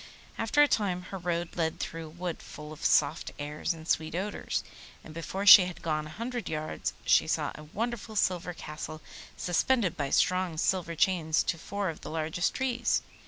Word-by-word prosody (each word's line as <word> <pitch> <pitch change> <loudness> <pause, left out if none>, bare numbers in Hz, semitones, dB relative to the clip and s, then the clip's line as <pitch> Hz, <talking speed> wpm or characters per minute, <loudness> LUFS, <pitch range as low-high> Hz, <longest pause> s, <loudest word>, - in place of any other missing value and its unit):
After 260 +7 +3
a - - +5
time 185 -8 0
her 195 - -4
road 170 -1 -2
led 160 -2 -1
through 165 -1 -5
a - - -11
wood, 175 +1 -5
full 150 0 -9
of 155 - -12
soft - - +3
airs 150 +1 -3
and 160 -1 -7
sweet 160 0 0
odours, 200 +4 -2 0.4
and 155 - -11
before 185 +4 -4
she 195 -2 +11
had 180 -1 -7
gone 155 -2 -1
a 155 - -11
hundred 240 +1 -4
yards 155 0 -3
she - - +5
saw - - 0
a 150 - -11
wonderful 220 +5 -4
silver 180 -3 0
Castle 155 0 -7 0.4
suspended 185 +2 +1
by 140 -2 -2
strong 180 -1 +2
silver 170 0 0
chains 160 -2 +2
to - - 0
four 200 +3 -3
of 160 - -7
the - - -7
largest 160 +2 -1
trees. 245 -2 0
175 Hz, 185 wpm, -29 LUFS, 155-195 Hz, 0.4 s, she